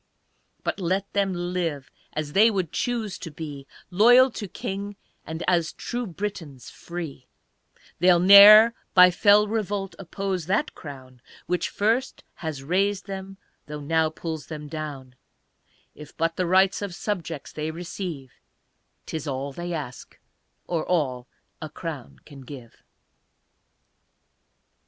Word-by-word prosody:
But - - -2
let 190 +2 -2
them 200 -1 +1 0.2
live, 160 -7 -3 0.2
as 150 -1 -4
they 215 +4 +6
would 190 -7 -2
choose 230 -5 -2
to 165 - -7
be, 145 -3 -8 0.2
Loyal 245 +7 +6
to 210 -2 -6
King, 200 +2 -5 0.3
and 160 +1 -5
as 170 -3 +1
true 245 -1 -4
Britons 165 -9 -6
free, 160 -7 -8 0.7
They'll 175 0 +5
ne'er 205 +5 +9 0.2
by 180 -1 +8
fell 205 +3 +5
revolt 205 -3 -2
oppose 190 -2 -4
that 210 +11 0
crown 130 -4 -11 0.2
Which 180 -1 -1
first 230 +6 -1
has 155 -5 -5
raised 195 +6 0
them, 195 0 -7 0.3
though 150 0 -6
now 160 +2 +1
pulls 160 -2 -6
them 150 -2 -7
down; 145 -4 -7 0.8
If 150 -1 -13
but 165 0 0
the 180 - -1
rights 190 +2 +3
of 200 -4 -5
subjects 170 -7 -4
they 155 0 -4
receive, 165 -4 -6 0.7
'Tis 160 -1 -5
all 135 0 -4
they 175 +4 -5
ask 145 -7 -7 0.5
or 165 -3 -2
all 130 -8 -1 0.3
a 155 - -6
crown 150 -4 -8
can 140 -3 -13
give. 130 -3 -12
175 Hz, 130 wpm, -25 LUFS, 150-195 Hz, 0.8 s, ne'er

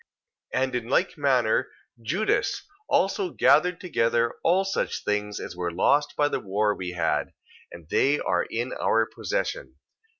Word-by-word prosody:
2:14. 130 - +2
And 130 -1 -2
in 120 -2 -3
like 185 +8 +1
manner 130 -7 +2 0.3
Judas 170 - 0 0.3
also 195 -1 +1
gathered 175 +2 +3
together 120 -8 +1
all 185 +3 +3
such 195 - -2
things 105 0 -2
as - - -7
were 90 -1 -2
lost 145 - +2
by 145 - +3
the - - -2
war 105 +2 0
we 90 -2 -5
had, 90 - -1 0.4
and 85 -3 -12
they 140 - +2
are - - 0
in 120 +3 -3
our 115 0 +2
possession. - - -4
130 Hz, 155 wpm, -26 LUFS, 105-165 Hz, 0.4 s, gathered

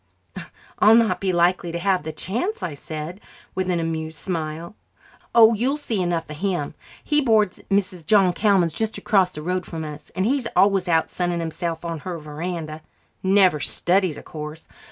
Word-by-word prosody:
"I'll 215 +2 +7
not 215 -6 +3
be 190 -1 +1
likely 175 0 +2
to 170 - -3
have 185 +1 +1
the 160 +1 -5
chance," 250 - -3
I 165 - -2
said, 155 +6 -7 0.3
with 185 0 -2
an 175 -2 +1
amused 160 -1 -3
smile. 165 0 -4 0.6
"Oh, 230 -1 +8
you'll 255 +7 0
see 230 -9 -2
enough 175 -2 -1
of 150 - -8
him. 180 -5 -2 0.3
He 295 -1 +2
boards 220 -7 +2
at - - -21
Mrs. 190 -3 0
John 195 -4 +5
Callman's, 190 -5 +2
just 220 +4 -2
across 190 -4 +2
the 150 -3 -8
road 180 +2 -1
from 160 -2 -6
us, 150 -1 -9
and 185 +1 0
he's 255 0 +1
always 195 -2 +4
out 165 -2 +2
sunning 175 -1 -1
himself 165 0 -4
on 165 -1 -3
her 175 +3 -5
verandah. 155 +1 -5 0.4
Never 190 -4 +4
studies, 180 +3 +1
of - - -11
course. 150 0 -8
180 Hz, 180 wpm, -23 LUFS, 160-200 Hz, 0.6 s, Oh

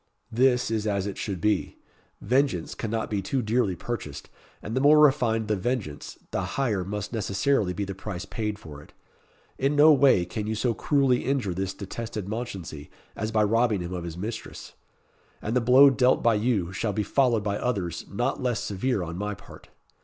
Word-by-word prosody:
This 125 0 +2
is 110 -1 -1
as 100 -2 0
it 100 - -4
should 95 -4 -4
be. 105 +2 0 0.4
Vengeance 125 - +1
cannot 110 0 -3
be 100 -2 0
too 125 +6 -1
dearly 110 -3 +1
purchased, 95 -10 -6 0.3
and 110 - -6
the 130 - +1
more 150 +2 +6
refined 125 -7 +3
the 105 - +1
vengeance, 105 - -4
the - - -1 0.2
higher 110 -9 0
must 105 +4 -5
necessarily 105 0 +1
be 90 +3 -3
the 95 - -5
price 95 -1 -6
paid 105 -1 -3
for 75 -7 -11
it. - - -18 0.7
In 135 +2 +1
no 150 +2 +7
way 135 -10 +4
can 105 +4 -4
you 110 - -1
so 115 +2 0
cruelly 135 0 +2
injure 130 -9 0
this 95 +1 -3
detested 110 0 -6
Mounchensey, 95 -10 -6 0.3
as 110 +2 -3
by 110 -1 +3
robbing 110 -1 +2
him 85 +1 -5
of 90 -2 -4
his 85 -1 -6
mistress. 110 +5 -6 0.7
And 110 +3 -3
the 125 - +3
blow 130 +4 +7
dealt 125 +1 +3
by 115 - +4
you, 105 -5 0
shall 105 +2 -2
be 105 - -1
followed 120 -3 +2
by 100 -1 -1
others 100 -9 -2
not - - -1
less 125 -3 -1
severe 105 +1 -1
on 85 +1 -6
my 105 0 -3
part." - - -15
110 Hz, 190 wpm, -26 LUFS, 95-125 Hz, 0.7 s, no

